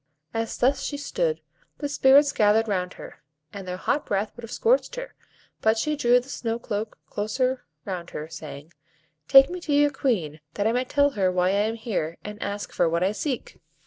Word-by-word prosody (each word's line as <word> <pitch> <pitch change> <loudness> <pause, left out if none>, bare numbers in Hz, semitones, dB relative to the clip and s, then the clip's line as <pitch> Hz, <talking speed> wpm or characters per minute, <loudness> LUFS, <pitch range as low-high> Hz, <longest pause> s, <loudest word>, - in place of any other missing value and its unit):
As 225 0 -2
thus 265 +3 +2
she 285 - -3
stood, 470 - -1 0.4
the 290 - -3
Spirits 280 0 +5
gathered 215 0 +3
round 180 -3 -1
her, - - -11 0.3
and 195 -2 -7
their 180 0 -3
hot 285 +9 0
breath 205 +1 -1
would 240 - -10
have 230 - -8
scorched - - +2
her, - - -6 0.5
but 220 +1 +3
she 305 +7 0
drew 245 -4 +4
the 250 - -12
snow 230 -4 -3
cloak 215 -2 -4
closer 255 +5 -1 0.2
round 180 -3 -5
her, 150 - -6
saying,— 155 0 -9 0.5
"Take 270 0 +9
me 360 0 -5
to 315 - -4
your 290 0 +4
Queen, 190 - -1 0.2
that 205 - -1
I 220 - +3
may 250 +2 0
tell 285 +2 +3
her 190 -6 +1
why 180 0 +2
I 200 +2 +2
am 225 - -3
here, 195 -8 -3
and 210 +1 -8
ask 205 0 -4
for 175 -2 +2
what 170 +2 +1
I 190 - +2
seek." 255 +5 -4
225 Hz, 205 wpm, -25 LUFS, 195-275 Hz, 0.5 s, Take